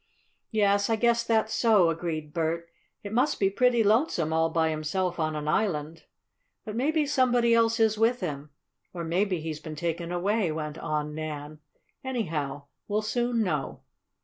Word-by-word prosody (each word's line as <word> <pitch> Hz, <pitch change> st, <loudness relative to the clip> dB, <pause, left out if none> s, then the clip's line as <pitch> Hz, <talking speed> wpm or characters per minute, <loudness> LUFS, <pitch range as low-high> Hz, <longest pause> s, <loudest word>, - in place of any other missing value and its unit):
"Yes, 200 Hz, -2 st, +2 dB
I 225 Hz, -, +3 dB
guess 235 Hz, +1 st, +2 dB
that's 220 Hz, -1 st, +1 dB
so," 210 Hz, -8 st, +4 dB
agreed 155 Hz, -2 st, -4 dB
Bert. 170 Hz, 0 st, -1 dB, 0.4 s
"It 205 Hz, 0 st, -6 dB
must 250 Hz, +6 st, +1 dB
be 195 Hz, -1 st, +2 dB
pretty 240 Hz, +1 st, +3 dB
lonesome, 210 Hz, -, +2 dB
all 160 Hz, 0 st, +2 dB
by 160 Hz, -1 st, +1 dB
himself 170 Hz, +4 st, -2 dB
on 155 Hz, -1 st, 0 dB
an 150 Hz, 0 st, -4 dB
island." 160 Hz, -3 st, -1 dB, 0.6 s
"But 215 Hz, -1 st, -5 dB
maybe 300 Hz, +5 st, +1 dB
somebody 245 Hz, -4 st, +3 dB
else 230 Hz, 0 st, +3 dB
is 220 Hz, -1 st, +3 dB
with 235 Hz, +2 st, +3 dB
him, 150 Hz, -5 st, -5 dB, 0.5 s
or 170 Hz, -, -4 dB
maybe 180 Hz, +1 st, 0 dB
he's 155 Hz, -1 st, -5 dB
been 155 Hz, 0 st, -8 dB
taken 170 Hz, +2 st, -3 dB
away," 190 Hz, +1 st, 0 dB
went 155 Hz, 0 st, -5 dB
on 150 Hz, -1 st, -2 dB
Nan. 155 Hz, -1 st, -6 dB, 0.4 s
"Anyhow 160 Hz, -, -3 dB, 0.2 s
we'll 210 Hz, +1 st, 0 dB
soon 240 Hz, +1 st, 0 dB
know." 155 Hz, -8 st, -3 dB
180 Hz, 160 wpm, -27 LUFS, 155-225 Hz, 0.6 s, so